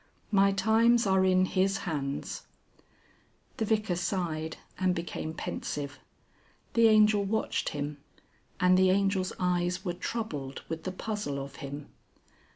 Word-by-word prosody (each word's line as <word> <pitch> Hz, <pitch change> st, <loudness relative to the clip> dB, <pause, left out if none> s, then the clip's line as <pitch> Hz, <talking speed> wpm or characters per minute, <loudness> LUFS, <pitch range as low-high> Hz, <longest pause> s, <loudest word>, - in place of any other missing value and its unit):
My 195 Hz, -1 st, +5 dB
times 225 Hz, +3 st, +4 dB
are 190 Hz, -1 st, +3 dB
in 185 Hz, 0 st, +4 dB
His 190 Hz, +1 st, +1 dB
hands 145 Hz, -5 st, -3 dB, 0.6 s
" -, -, -35 dB
The 220 Hz, -, 0 dB
Vicar 215 Hz, -4 st, +1 dB
sighed 165 Hz, -3 st, -2 dB, 0.2 s
and 185 Hz, -1 st, +2 dB
became 165 Hz, -2 st, -4 dB
pensive. 145 Hz, -3 st, -4 dB, 0.7 s
The 230 Hz, -1 st, +6 dB
Angel 215 Hz, -1 st, +5 dB
watched 220 Hz, +3 st, -1 dB
him, 145 Hz, -1 st, -4 dB, 0.6 s
and 185 Hz, 0 st, +5 dB
the 190 Hz, 0 st, +5 dB
Angel's 195 Hz, -1 st, +2 dB
eyes 180 Hz, 0 st, 0 dB
were 175 Hz, -, -1 dB
troubled 160 Hz, -, -4 dB
with 160 Hz, 0 st, -5 dB
the 185 Hz, -, -1 dB
puzzle 205 Hz, -7 st, -3 dB
of 140 Hz, 0 st, -7 dB
him. 140 Hz, +1 st, -7 dB
185 Hz, 135 wpm, -29 LUFS, 160-200 Hz, 0.7 s, The